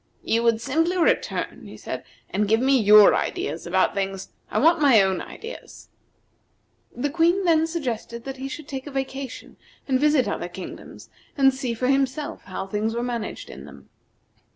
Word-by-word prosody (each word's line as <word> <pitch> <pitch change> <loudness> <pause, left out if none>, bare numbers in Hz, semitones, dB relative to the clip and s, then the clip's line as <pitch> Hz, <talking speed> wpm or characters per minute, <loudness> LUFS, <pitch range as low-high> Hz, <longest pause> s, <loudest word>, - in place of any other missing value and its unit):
"You 230 - +1
would 230 -1 +2
simply 325 +8 0
return," 340 - 0
he - - -11
said, - - -6 0.3
"and 210 0 0
give 220 +2 +3
me 265 +2 +3
your 210 -1 +8
ideas 160 +4 -2
about 185 +2 +2
things. 195 -1 -3 0.2
I - - -2
want 330 +2 +4
my 270 -7 +6
own 190 -1 +2
ideas." 460 +2 -10 1.0
The 275 +4 -3
Queen 345 +4 +2
then 325 -2 +3
suggested 240 -7 -4
that 270 0 -6
he 265 +1 -5
should 300 +1 -8
take 270 0 -6
a - - -7
vacation, 270 0 -5 0.3
and 260 -2 +2
visit 295 -3 +3
other 175 - -3
kingdoms, 185 +1 -10 0.3
and 270 -1 +5
see 255 -3 -3
for 250 - -2
himself 275 +2 -1
how 185 0 -5
things 215 +3 -2
were 235 - -1
managed 235 -3 -4
in - - -10
them. - - -14
260 Hz, 175 wpm, -24 LUFS, 215-290 Hz, 1.0 s, your